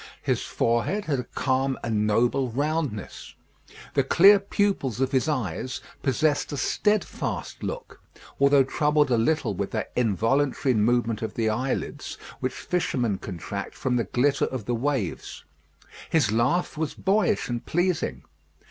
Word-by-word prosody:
His - - 0
forehead 120 - 0
had 140 -4 0
a - - -2
calm 130 0 0
and 105 -2 0
noble 120 +4 +2
roundness. 145 - -3 0.6
The 140 - +3
clear 195 +9 +7
pupils 195 - 0
of 130 0 +1
his 135 +3 +1
eyes 130 - -2 0.2
possessed 145 +3 +1
a 145 - -3
steadfast 210 +9 -1
look, - - -6 0.4
although 140 0 +5
troubled 150 +1 +2
a 120 - +4
little 155 +7 +1
with - - -3
that - - -3
involuntary 125 +4 +1
movement 115 0 +1
of 110 -2 -4
the 110 -2 +1
eyelids 130 +4 -3 0.2
which - - -1
fishermen 125 - -1
contract 90 -5 -6
from 125 -1 -1
the 115 - 0
glitter 135 +8 +2
of 130 -6 -5
the 120 - -1
waves. 120 - -2 0.6
His 145 -10 +2
laugh 135 +9 +1
was 160 -2 -2
boyish 200 +3 +1
and 120 -1 -3
pleasing. 175 0 -1
130 Hz, 140 wpm, -25 LUFS, 115-155 Hz, 0.6 s, clear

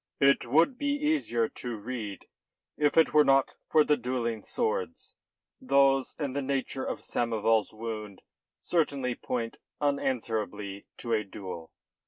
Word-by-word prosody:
"It 140 -3 +4
would 165 - +3
be 285 0 +1
easier 290 - +1
to 120 -1 -6
read 105 -2 -6 0.5
if 150 +1 +1
it 160 - +5
were 150 0 +7
not 135 -1 +3
for 155 - +6
the 150 - +3
duelling 120 -4 -2
swords. 460 +1 -2 0.5
Those 135 - +3
and 140 -3 -3
the 140 - 0
nature 135 -1 -2
of - - -3
Samoval's 115 -2 +1
wound 110 -3 -6 0.3
certainly 140 -7 0
point 115 -1 -3 0.2
unanswerably 110 -8 -2
to 120 -2 -3
a 110 -1 +2
duel. 95 -4 -8
125 Hz, 135 wpm, -29 LUFS, 110-145 Hz, 0.5 s, were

